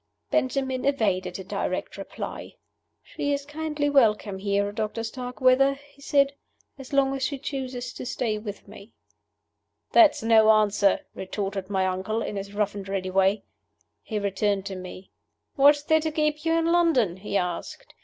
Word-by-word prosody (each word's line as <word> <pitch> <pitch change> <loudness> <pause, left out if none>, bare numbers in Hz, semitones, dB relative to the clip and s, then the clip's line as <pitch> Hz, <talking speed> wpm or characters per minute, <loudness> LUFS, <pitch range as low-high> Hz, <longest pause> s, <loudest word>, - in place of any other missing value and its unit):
Benjamin 265 -3 0
evaded 215 -10 0
a 190 - -7
direct - - -3
reply. - - -7 0.5
"She 285 0 -3
is 280 0 -3
kindly 300 0 -2
welcome 215 -8 +2
here, 200 0 0
Doctor 215 +2 -3
Starkweather," 255 +3 +2
he 285 0 -21
said, 280 0 +2 0.5
"as 270 - -10
long 275 -1 +2
as 270 - -4
she 280 +1 -1
chooses 260 -2 -5
to - - -7
stay 225 -4 -2
with 210 -2 -8
me." 200 +3 -14 1.0
"That's 320 -9 +5
no 220 -1 +5
answer," 210 -2 +3
retorted 195 0 -4
my 190 -2 +1
uncle, 190 +5 -2
in - - -4
his 200 0 -5
rough 205 -1 0
and 195 -1 -7
ready 190 -1 -2
way. 195 +2 +2 0.6
He 215 -2 -4
turned 200 0 0
to 195 - -5
me. 185 +1 -9 0.4
"What 285 0 +7
is 290 - -9
there 315 +1 +3
to 315 0 -2
keep 305 0 -1
you 325 - +2
in 330 0 +2
London?" 330 - +2
he 200 +1 -2
asked. 180 -2 -4
225 Hz, 165 wpm, -25 LUFS, 200-280 Hz, 1.0 s, What